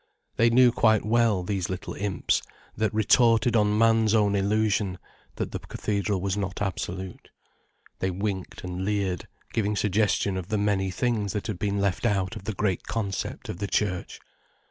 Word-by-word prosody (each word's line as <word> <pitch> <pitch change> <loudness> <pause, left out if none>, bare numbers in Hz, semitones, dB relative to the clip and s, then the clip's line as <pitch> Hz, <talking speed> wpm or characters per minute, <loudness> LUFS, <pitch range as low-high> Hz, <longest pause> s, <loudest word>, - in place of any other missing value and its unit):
They 115 +1 +4
knew 125 +1 +6
quite 110 -3 +3
well, 110 -4 +2
these 95 -1 -2
little 95 0 -5
imps 100 -3 0 0.3
that 110 -1 0
retorted 115 +2 +4
on 105 -1 +3
man's 115 -1 +4
own 105 -2 +3
illusion, 100 -1 +1 0.4
that - - -3
the - - -4
cathedral 100 -1 -2
was 95 +1 -1
not 100 -2 -3
absolute. 95 -1 -4 0.7
They 95 - 0
winked 95 0 -4
and 90 0 -4
leered, 100 -3 -1 0.3
giving 105 -2 0
suggestion 100 -1 +1
of 90 -2 -5
the 105 +1 -1
many 100 -2 +1
things 105 0 -1
that 105 - -3
had 105 -5 -4
been 100 0 -1
left 100 +3 +1
out 95 -4 0
of 95 - -9
the 110 - -2
great 95 -3 -1
concept 105 -3 -3
of 90 - -6
the 100 - -2
church. 95 -3 -1
100 Hz, 165 wpm, -26 LUFS, 95-110 Hz, 0.7 s, knew